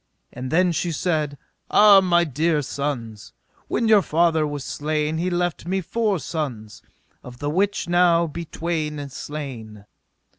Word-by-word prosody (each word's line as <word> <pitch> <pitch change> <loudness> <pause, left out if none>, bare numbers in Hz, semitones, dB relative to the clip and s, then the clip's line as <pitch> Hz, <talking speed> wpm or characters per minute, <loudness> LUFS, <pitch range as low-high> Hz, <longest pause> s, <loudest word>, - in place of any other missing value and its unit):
And 125 +1 -6
then 180 +2 +3
she 170 +2 -1
said: 155 -3 -1 0.3
Ah, 205 -2 +7
my 175 -2 +3
dear 155 0 0
sons, 120 -7 -5 0.3
when 230 - 0
your 215 -2 +6
father 160 -2 +2
was 145 -2 -5
slain 150 +2 -2
he 180 +2 0
left 175 -2 -2
me 190 +2 0
four 210 +2 -1
sons, 130 -11 -5 0.4
of 125 0 -11
the 145 +2 -3
which 195 +4 0
now 175 -1 +4
be 170 +2 -6
twain 155 -3 -3
slain. 125 -8 -8
160 Hz, 145 wpm, -23 LUFS, 145-175 Hz, 0.4 s, Ah